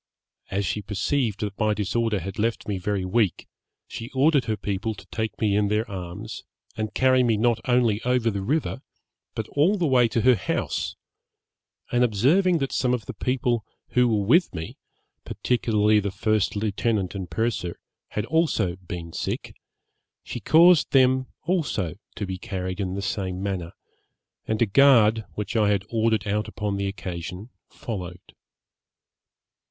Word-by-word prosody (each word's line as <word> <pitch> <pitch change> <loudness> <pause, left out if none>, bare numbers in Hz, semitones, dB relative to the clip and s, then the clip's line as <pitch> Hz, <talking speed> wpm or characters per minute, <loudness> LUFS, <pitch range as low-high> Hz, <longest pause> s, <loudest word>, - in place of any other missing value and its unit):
As 100 +1 -1
she 105 - -2
perceived 110 +2 -1
that 100 -2 -4
my 110 -1 +2
disorder 105 0 0
had 95 +4 -6
left 115 +2 -1
me 100 -3 -2
very 95 0 -1
weak, 100 0 0 0.4
she 115 - -7
ordered 140 -1 +4
her 110 -1 -1
people 105 +2 -3
to - - -13
take 110 -1 -3
me 105 -3 +2
in 105 0 +2
their 105 +2 0
arms, 100 +4 -7 0.3
and 110 -2 -4
carry 130 0 +4
me 115 -3 +2
not 115 +1 +2
only 120 -4 +3
over 125 -2 +1
the 100 -1 -3
river, 140 +4 -1 0.5
but 110 - -3
all 170 +9 +2
the 175 - 0
way 125 -4 +4
to 115 0 0
her 130 +2 +6
house; 100 -4 -2 1.0
and 120 0 +3
observing 145 - +3
that 135 -3 -2
some 125 -1 +1
of 115 - -7
the - - -6
people 125 -3 0 0.3
who 125 0 +3
were 105 -4 +1
with 170 - +4
me, 80 -1 -6 0.5
particularly 110 -3 +2
the 100 0 -2
first 110 +1 0
lieutenant 105 -1 -1
and 95 -3 -5
purser, 110 -7 -2 0.3
had 105 - -3
also 115 - +1
been 85 -2 -7
sick, - - -4 0.7
she - - -6
caused 170 0 +5
them 130 -1 +4 0.2
also 145 - -1 0.2
to 105 - -3
be 95 -1 -5
carried 95 0 -4
in 95 -1 -2
the 100 - -3
same 95 -1 -3
manner, 95 -4 -3 0.7
and 110 +1 +2
a - - +3
guard, 115 -2 +5
which 105 +2 -4
I 105 -2 +3
had 100 -1 +1
ordered 110 -1 +1
out 105 +1 0
upon 105 -2 -3
the 100 0 -1
occasion, 95 +2 -6 0.2
followed. 90 -5 -7
110 Hz, 160 wpm, -25 LUFS, 100-125 Hz, 1.0 s, her